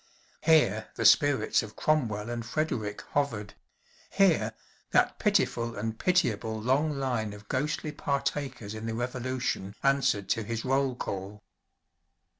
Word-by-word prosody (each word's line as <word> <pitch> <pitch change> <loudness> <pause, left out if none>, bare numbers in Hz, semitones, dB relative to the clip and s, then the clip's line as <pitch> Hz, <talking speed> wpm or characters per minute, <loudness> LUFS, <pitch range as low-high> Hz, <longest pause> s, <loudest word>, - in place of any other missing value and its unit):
Here 150 -10 +3
the - - -2
spirits 140 -7 +5
of 110 -1 -9
Cromwell 120 -8 0
and 120 -1 -3
Frederick 110 -7 -2
hovered; 115 -8 -1 0.6
here 160 - +3 0.4
that - - +2
pitiful 115 0 +1
and 110 +2 -4
pitiable 115 - +1
long 140 +6 +1
line 120 -6 -1
of 105 0 -12
ghostly 150 +3 -1
partakers 140 -6 -2
in 110 +1 -6
the 115 - -2
Revolution 125 -4 -3
answered 135 -8 +2
to 115 - +1
his 115 +2 -4
roll 135 0 +1
call. 100 -2 -5
120 Hz, 125 wpm, -29 LUFS, 110-140 Hz, 0.6 s, spirits